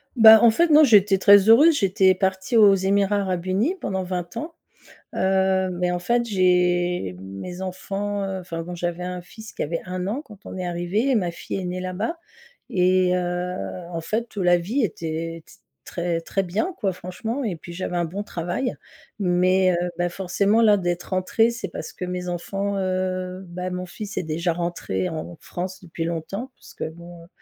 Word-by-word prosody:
Bah, 220 -1 +10
en 235 - +7
fait 335 +9 +3
non, 305 0 +7
j'étais 205 -4 +5
très 200 +2 +6
heureuse, 295 +7 +7
j'étais 190 -1 +3
partie 190 +4 -1
aux 205 -3 +7
Émirats 200 +2 +2
Arabes 185 -3 -2
Unis 215 - +1
pendant 190 -1 -2
20 180 -1 -4
ans. 325 +2 -5 0.6
Heu, 190 0 +2
beh, 180 0 -1
en 175 - -1
fait, 235 +6 +1
j'ai 180 - +1
mes 95 - -7
enfants, 195 +2 -3
heu 190 -1 -3
enfin 170 -2 -5
bon, 180 +1 -7
j'avais 175 0 -3
un 180 0 -4
fils 220 +4 -12
qui - - -7
avait 165 +3 -2
1 180 0 -4
an 250 +8 -2
quand 210 -6 -16
on - - -7
est 180 - -3
arrivés 175 +9 -1
et 260 - +3
ma 180 -5 0
fille 170 - -6
est 185 - -4
née 180 +1 -3
là-bas 200 - -3 0.5
et 185 0 +3
heu, 180 0 -2 0.4
en 165 - -3
fait, 220 +4 -3
heu, - - 0
la 175 0 +5
vie 225 +10 -1
était 165 -1 -5
t - - -17 0.3
très, 170 -1 -2
très 195 +3 -1
bien, 215 - -2
quoi, 195 -5 0
franchement 220 +10 -5
et 200 -7 -2
puis, 170 +2 -10
j'avais 180 0 -3
un 170 - +1
bon 195 +5 -5
travail. 180 +9 -3 0.4
Mais 185 0 +3
heu, 175 - -1
bah, 175 0 +1
forcément 200 +4 +1
là, 210 -2 +6
d'être 175 -1 -2
rentrée, 185 +5 +2
c'est 235 - -5
parce - - -7
que 180 - -5
mes 180 0 -4
enfants, 195 +3 -3
heu 185 0 -2
bah, 180 +1 -4
mon 180 0 -4
fils 210 +3 -8
est - - 0
déjà 165 +2 -1
rentré 175 +1 -2
en 160 +1 -6
France 185 +1 -6
depuis 165 -1 -5
longtemps 195 +10 -4
parce - - -16
que - - -5
bon, 170 +1 -12
heu, - - -20
185 Hz, 195 wpm, -23 LUFS, 175-200 Hz, 0.6 s, Bah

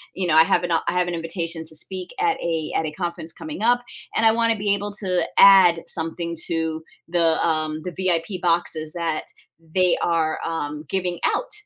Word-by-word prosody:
you 185 -1 -1
know, 160 - +2
I 160 - +8
have 165 - +1
an 175 - -2
I 165 - +3
have 180 0 +1
an 175 - -3
invitation 165 0 -4
to 160 - -9
speak 185 +3 -4
at 420 -1 +1
a 165 -2 -2
at 160 - +1
a 155 - -3
conference 170 -1 -5
coming 305 -6 -7
up, 245 +1 +3 0.3
and 225 - +2
I 220 - +7
wanna 230 -1 +1
be 200 0 +1
able 205 +1 -5
to 185 -4 0 0.2
add 185 -4 +7
something 170 +1 -1
to 160 -1 -2 0.2
the, 165 -1 +2
um, 155 -1 -1
the 180 - -5
VIP 180 0 -1
boxes 165 -2 0
that 165 -3 -2 0.5
they 185 -1 +3
are, 160 -2 0
um, 150 -2 -4
giving 180 -2 -2
out, - - 0
170 Hz, 195 wpm, -22 LUFS, 160-190 Hz, 0.5 s, I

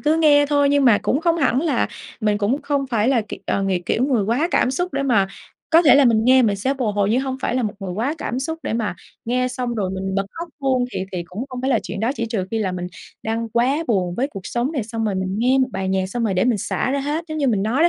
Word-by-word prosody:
cứ 305 +2 +2
nghe 295 -3 +5
thôi 285 -1 +3
nhưng 285 -1 +3
mà 230 -5 +6
cũng 275 - +1
không 335 0 +2
hẳn 270 -4 +2
là 295 -6 +1 0.3
mình 210 -2 +1
cũng 230 +8 0
không 280 -2 -1
phải 230 -3 +1
là 255 -4 +3
kiểu, - - -7
ờ, 200 - 0
ng 195 - 0 0.2
kiểu, 245 - +1
người 250 -7 +1
quá 250 - +1
cảm 250 - +2
xúc 355 +6 -2
để 275 0 -1
mà 230 -8 +3 0.4
có 330 +1 +6
thể 300 - +7
là 285 0 +6
mình 225 -2 +3
nghe 260 +1 +6
mình 210 -4 +2
sẽ 260 +8 -1
bồi 245 -6 -1
hồi. 200 -1 +1
Nhưng 245 +4 +2
hông 265 -1 -3
phải 245 - -1
là 255 - +1
một 210 - -1
người 190 -2 -4
quá 235 - -1
cảm 250 - -3
xúc 320 +4 -3
để - - -3
mà 220 -4 -1 0.3
nghe 255 +2 0
xong 250 -1 -3
rồi 195 -4 -1
mình 190 0 -3
bật 195 0 0
khóc 340 +1 -6
luôn, 260 -2 +1
thì 185 - -2
thì 180 - -2
cũng 195 +8 -5
không 255 -2 -6
phải 265 +2 0
là 235 - +3
chuyện 195 - -5
đó. 225 +3 +1
Chỉ 230 -2 -3
trừ 220 -5 -2
khi 225 - -1
là 195 -4 -1
mình 180 0 -4 0.4
đang 225 +1 -2
quá 260 +8 +1
buồn 185 -6 +1
với 265 +8 -1
cuộc 200 -9 -8
sống 245 +8 -2
nè, 275 -7 -1
xong 225 +1 -4
rồi 210 -2 0
mình 190 0 -2
nghe 255 +3 +3
một 260 -1 +2
bài 190 0 -2
nhạc 190 0 0
xong 230 +5 -3
rồi 200 - 0
để 185 - +2
mình 245 -4 +2
xả 220 - -1
ra 280 - 0
hết, 300 +4 -2
giống 310 0 -4
như 280 -3 +2
mình 205 -5 +1
nói 240 +8 +1
đó. 340 - +6
245 Hz, 300 wpm, -21 LUFS, 210-275 Hz, 0.4 s, thể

